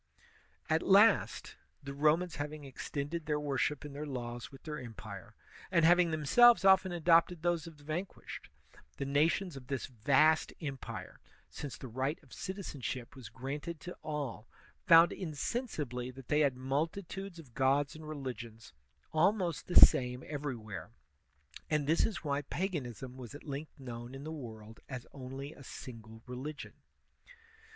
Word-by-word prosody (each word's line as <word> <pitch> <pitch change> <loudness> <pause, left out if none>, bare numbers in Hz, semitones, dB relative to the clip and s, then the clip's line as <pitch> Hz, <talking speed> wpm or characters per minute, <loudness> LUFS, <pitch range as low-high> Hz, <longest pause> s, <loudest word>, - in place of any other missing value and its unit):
At 160 +1 +2
last, 205 +4 +4 0.3
the 140 0 -6
Romans 155 +4 +2
having 150 +1 -4
extended 145 +4 -4
their 150 -1 +1
worship 145 0 -1
and 145 - -7
their 150 +2 -5
laws 120 -2 -5
with 135 - -14
their 150 -1 -5
empire, 115 -3 -9 0.3
and 165 -1 +4
having 175 +1 +6
themselves 195 - +6
often 190 -1 +6
adopted 170 0 +4
those 175 -2 +1
of 165 -2 -11
the 145 - -17
vanquished, 165 +6 -5 0.5
the 140 - -2
nations 155 +5 +2
of 130 -2 -10
this 135 -2 -2
vast 135 +6 +3
empire, 120 - -6 0.3
since 145 -3 -6
the 130 - -8
right 130 +6 -1
of 135 - -16
citizenship 145 -10 -5
was 125 -6 -9
granted 145 +7 -5
to 180 - -7
all, 140 -8 -4 0.4
found 165 0 +8
insensibly 150 - -3
that 130 0 -11
they 150 - +3
had 140 -4 +3
multitudes 170 +8 -3
of 145 -8 -13
gods 135 +2 +2
and 155 -1 -9
religions, 120 - -7 0.4
almost 175 -2 +2
the 180 - -4
same 125 0 +7
ever3rwhere; 125 - -5 0.8
and 150 -2 +1
this 160 +3 +3
is 200 -7 -5
why 145 -1 0
paganism 135 - -4
was 125 +1 -8
at 145 - -10
length 145 +1 -6
known 120 -1 -7
in 135 - -8
the 155 - -5
world 110 -7 -8
as 125 -3 -6
only 135 +2 -7
a 140 - -13
single 115 -3 -10
religion. 130 +4 -6
145 Hz, 150 wpm, -33 LUFS, 130-160 Hz, 0.8 s, found